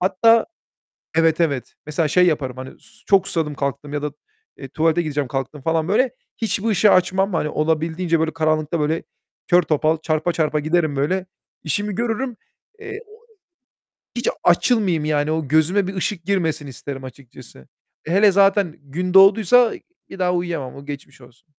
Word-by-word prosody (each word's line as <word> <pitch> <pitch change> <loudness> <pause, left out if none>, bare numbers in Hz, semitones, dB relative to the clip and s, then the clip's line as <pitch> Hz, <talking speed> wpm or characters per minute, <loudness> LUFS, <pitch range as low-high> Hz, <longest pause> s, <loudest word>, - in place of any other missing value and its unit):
Hatta 220 +5 +3 0.7
Evet, 165 0 +3
evet, 140 -6 -1
mesela 150 +1 -1
şey 180 +5 +4
yaparım 135 -6 -1
hani 130 0 -7
s - - -22 0.2
çok 195 -2 +3
susadım 155 -3 -1
kalktım 140 +1 -4
ya 145 - -2
da, 150 0 -3 0.5
eee, 135 - -8
tuvalete 160 +4 +1
gideceğim 145 -4 -2
kalktım 135 +3 -5
falan 160 +2 0
böyle, 240 +6 +2 0.3
hiçbir 225 -1 -2
ışığı 210 0 +4
açmam. 190 +2 +2
Hani 150 -2 0
olabildiğince 160 +2 0
böyle 160 0 -1
karanlıkta 155 0 0
böyle, 155 +2 -1 0.4
kör 175 +1 +5
topal, 155 0 +1
çarpa 155 +2 -1
çarpa 155 -2 0
giderim 155 -1 0
böyle. 180 +7 -1 0.4
İşimi 205 +6 -2
görürüm. 240 +1 -2 0.4
Eee, 410 -1 -7 1.2
hiç 240 - -1 0.2
açılmayayım 180 -3 +2
yani, 150 0 0
o 160 -4 -2
gözüme 160 +6 +2
bir 195 - -5
ışık 185 -1 -3
girmesin 165 -6 -1
isterim 135 0 -8
açıkçası. 125 - -13 0.4
Hele 195 +4 +4
zaten 195 -3 +3
gün 175 +6 -4
doğduysa 215 +5 +6 0.4
bir - - -9
daha 180 -1 +1
uyuyamam. 170 -7 -3
O 140 - -11
geçmiş 140 -2 -9
olsun. 125 +4 -19
160 Hz, 155 wpm, -21 LUFS, 150-190 Hz, 1.2 s, doğduysa